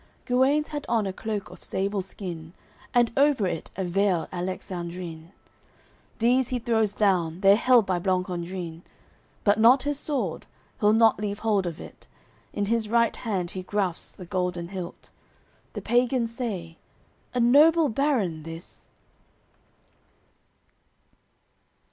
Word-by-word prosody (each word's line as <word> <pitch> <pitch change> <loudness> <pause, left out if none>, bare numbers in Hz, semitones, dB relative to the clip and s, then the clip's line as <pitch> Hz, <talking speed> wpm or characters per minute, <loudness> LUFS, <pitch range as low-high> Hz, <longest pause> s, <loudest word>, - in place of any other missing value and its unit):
Guenes 270 +4 +2
had 295 -1 -4
on 225 -3 +2
a 190 - -3
cloke 210 -1 -4
of - - -13
sable 195 +1 -1
skin, 175 -4 -8 0.4
And 240 -1 +3
over 280 -6 +3
it 170 -3 -3
a 190 - -1
veil 185 -1 +1
Alexandrin; 175 -2 -5 0.9
These 245 +2 +2
he 255 - -1
throws 225 -3 +1
down, 185 -5 +1
they're 195 0 +7
held 240 0 +4
by 185 -2 0
Blancandrin; 180 -2 -3 0.6
But 205 +1 +3
not 245 +4 +6
his 290 0 -1
sword, 250 - -3 0.3
he'll 210 0 +4
not 225 -1 +4
leave 205 -1 -3
hold 205 -4 +2
of 165 -2 -5
it, - - -12 0.4
In 205 - -1
his 220 0 0
right 230 0 +3
hand 190 -7 -2
he 185 - -5
grasps 185 -2 -2
the 180 - -10
golden 180 -2 -2
hilt. 185 -3 -8 0.6
The - - -6
pagans 240 -1 +1
say. 185 -10 -4 0.6
"A - - +1
noble 300 +7 +6
baron, 225 - 0
this." 165 +2 -10
200 Hz, 130 wpm, -26 LUFS, 180-235 Hz, 0.9 s, they're